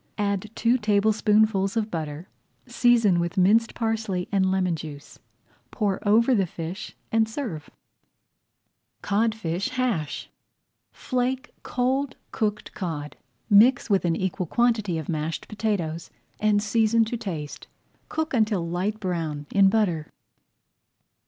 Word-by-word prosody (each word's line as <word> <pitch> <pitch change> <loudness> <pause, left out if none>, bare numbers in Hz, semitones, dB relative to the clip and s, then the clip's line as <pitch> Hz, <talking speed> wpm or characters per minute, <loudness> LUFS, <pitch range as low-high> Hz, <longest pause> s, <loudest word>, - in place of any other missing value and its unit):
Add 200 0 -1
two 240 +2 +2
tablespoonfuls 210 -1 +2
of 220 -1 -1
butter, 155 +1 -5 0.4
season 240 -6 +3
with 170 +3 -2
minced 215 +5 +4
parsley 220 -5 -1
and 190 -2 +2
lemon 185 -2 +1
juice, 150 -2 -9 0.5
pour 205 -4 -1
over 230 +5 +5
the 195 -5 +2
fish, 170 +4 -7 0.2
and 220 0 +2
serve. 220 - -5 1.3
[Page - - -8
109] 220 +3 +3
CODFISH 185 -3 -3
HASH 230 - -2 0.6
Flake 255 0 -2
cold 260 +2 -1 0.2
cooked 215 -1 -2
cod, 155 -6 -5 0.3
mix 230 +3 +5
with 195 - +3
an 170 -2 +1
equal 185 -1 -2
quantity 220 -5 +1
of 160 - -5
mashed 155 0 -3
potatoes, 185 -7 -2 0.3
and 210 -1 +2
season 225 +1 +3
to 225 - -3
taste. 160 -10 -6 0.4
Cook 315 -1 -2
until 215 -7 +1
light 190 +5 -2
brown 165 -6 -3
in 195 -1 +5
butter. 190 -8 0
205 Hz, 125 wpm, -25 LUFS, 175-225 Hz, 1.3 s, over